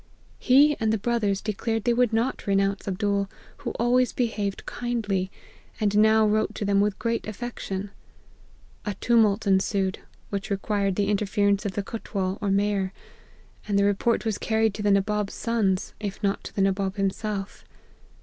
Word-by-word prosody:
He 285 Hz, +3 st, +5 dB
and 220 Hz, -2 st, +1 dB
the 220 Hz, -, +2 dB
brothers 210 Hz, -3 st, 0 dB
declared 225 Hz, +1 st, -2 dB
they 240 Hz, -, +3 dB
would 245 Hz, -1 st, +2 dB
not 225 Hz, +2 st, -1 dB
renounce 195 Hz, 0 st, +1 dB
Abdool, 200 Hz, 0 st, 0 dB, 0.3 s
who -, -, -4 dB
always 245 Hz, +1 st, +2 dB
behaved 210 Hz, -5 st, -2 dB
kindly, 210 Hz, -6 st, -2 dB, 0.5 s
and 205 Hz, -1 st, +1 dB
now 220 Hz, +1 st, +5 dB
wrote 215 Hz, +1 st, +1 dB
to 205 Hz, -, -3 dB
them 200 Hz, 0 st, +3 dB
with 205 Hz, -1 st, 0 dB
great 230 Hz, -1 st, -2 dB
affection. 205 Hz, -3 st, -5 dB, 0.9 s
A 205 Hz, -2 st, -3 dB
tumult 225 Hz, -1 st, +3 dB
ensued, 190 Hz, 0 st, +1 dB, 0.3 s
which 200 Hz, -1 st, -3 dB
required 200 Hz, -1 st, 0 dB
the 200 Hz, 0 st, +1 dB
interference 200 Hz, 0 st, +1 dB
of 190 Hz, -, -4 dB
the 205 Hz, -, -2 dB
cutwal, 195 Hz, -3 st, -3 dB
or 205 Hz, -, 0 dB
mayor; 200 Hz, -1 st, +1 dB, 0.8 s
and 200 Hz, -1 st, +1 dB
the 200 Hz, -, +4 dB
report 205 Hz, +4 st, +1 dB
was 220 Hz, -2 st, -1 dB
car 220 Hz, -1 st, 0 dB
ried 220 Hz, -2 st, +3 dB
to 210 Hz, -, -5 dB
the 205 Hz, -, +2 dB
Nabob's 205 Hz, +1 st, +1 dB
sons, 210 Hz, -6 st, 0 dB
if 205 Hz, 0 st, -5 dB
not 200 Hz, 0 st, 0 dB
to -, -, -8 dB
the 195 Hz, -, +2 dB
Nabob 195 Hz, 0 st, 0 dB
him 195 Hz, -1 st, +1 dB
self. 205 Hz, -1 st, -5 dB
205 Hz, 170 wpm, -25 LUFS, 195-220 Hz, 0.9 s, He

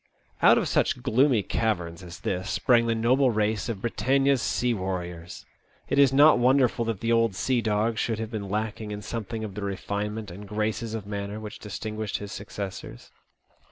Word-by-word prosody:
Out -, -, +7 dB
of -, -, +1 dB
such -, -, +1 dB
gloomy 125 Hz, -3 st, +3 dB
caverns 90 Hz, -7 st, -1 dB
as 85 Hz, -2 st, -10 dB
this 90 Hz, +1 st, -2 dB
sprang 120 Hz, -2 st, +3 dB
the 115 Hz, -, +1 dB
noble 125 Hz, +4 st, +3 dB
race 110 Hz, -1 st, 0 dB
of 105 Hz, -4 st, -4 dB
Britannia's 135 Hz, +3 st, +2 dB
sea 125 Hz, -1 st, 0 dB
warriors. 90 Hz, -4 st, -5 dB, 0.4 s
It 140 Hz, -, +2 dB
is 140 Hz, -2 st, +6 dB
not 145 Hz, 0 st, +6 dB
wonderful 125 Hz, -1 st, +3 dB
that 115 Hz, -4 st, -3 dB
the 115 Hz, 0 st, 0 dB
old 115 Hz, -3 st, +3 dB
sea 125 Hz, +4 st, +1 dB
dog 110 Hz, +1 st, 0 dB
should 115 Hz, -2 st, 0 dB
have 110 Hz, 0 st, -5 dB
been 100 Hz, -4 st, -4 dB
lacking 110 Hz, +1 st, -3 dB
in 105 Hz, 0 st, -6 dB
some 115 Hz, -2 st, -4 dB
thing 110 Hz, +1 st, -5 dB
of 105 Hz, -3 st, -5 dB
the 105 Hz, -, -6 dB
refinement 100 Hz, +1 st, -3 dB
and 100 Hz, +3 st, -9 dB
graces 110 Hz, +2 st, -2 dB
of 110 Hz, -3 st, -5 dB
manner 100 Hz, +1 st, -4 dB
which 110 Hz, 0 st, -8 dB
distinguish 110 Hz, 0 st, -4 dB
his 105 Hz, -1 st, -8 dB
successors. 100 Hz, -, -7 dB
110 Hz, 185 wpm, -26 LUFS, 100-115 Hz, 0.4 s, Out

